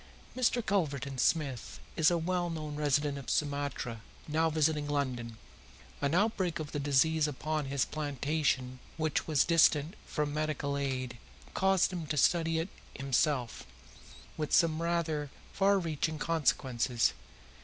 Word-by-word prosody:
Mr. 245 -2 +1
Culverton 140 -9 -1
Smith 140 -4 0 0.2
is 160 -1 +5
a 175 - +2
well 175 +1 -1
known 155 -3 -5
resident 145 -1 +1
of 135 - -8
Sumatra, 140 -6 -2 0.3
now 160 +2 +2
visiting 155 -1 +1
London. 125 -6 -2 0.6
An 140 +3 +1
outbreak 190 -4 +1
of 155 -3 -5
the 145 - -2
disease 145 +2 +3
upon 150 +1 -2
his 135 0 0
plantation, 145 -3 -1 0.2
which 155 -2 -1
was 150 -4 +3
distant 165 -1 +4
from 150 -2 -2
medical 150 -2 -1
aid, 130 -3 -3 0.3
caused 190 -1 +2
him 170 -4 -4
to 150 - -2
study 165 +2 +3
it 165 +4 -2 0.3
himself, 135 -2 0 0.7
with 150 -1 -3
some 165 -1 +3
rather 165 -4 -1 0.2
far 200 0 +3
reaching 160 -3 -1
consequences. 130 -6 +1
150 Hz, 135 wpm, -31 LUFS, 140-165 Hz, 0.7 s, is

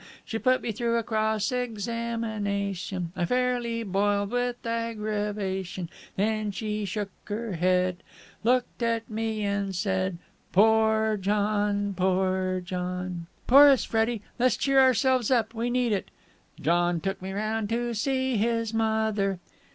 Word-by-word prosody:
She 225 - -3
put 255 +1 +2
me 235 - -1
through 235 +2 0
a 230 - 0
cross 220 +1 0
examination: 215 -6 -2
I 175 - -1
fairly 245 0 0
boiled 200 0 0
with 245 0 -2
aggravation: 210 -5 -2 0.3
Then 215 +1 0
she 210 +1 -3
shook 200 +1 -3
her 220 0 -4
head, 180 +1 +1 0.4
Looked 250 +2 +1
at 230 -1 0
me 220 -1 -2
and 200 -1 -1
said: 185 -1 -1 0.4
'Poor 220 +1 +4
John! 205 0 0
Poor 185 0 +1
John!' 180 -1 -4 0.2
Chorus, 275 0 +8
Freddie! 225 -1 0 0.2
Let's 250 -1 +3
cheer 275 -1 +3
ourselves 260 -2 +4
up! 230 -3 +2
We 235 +1 -2
need 245 -1 +1
it!" 195 - -2 0.5
John 175 +2 +2
took 195 +3 -3
me 190 +1 -5
round 215 +1 -2
to 240 +1 -1
see 260 +2 0
his 230 +1 0
mother...! 220 -3 +1
215 Hz, 130 wpm, -27 LUFS, 195-230 Hz, 0.5 s, Chorus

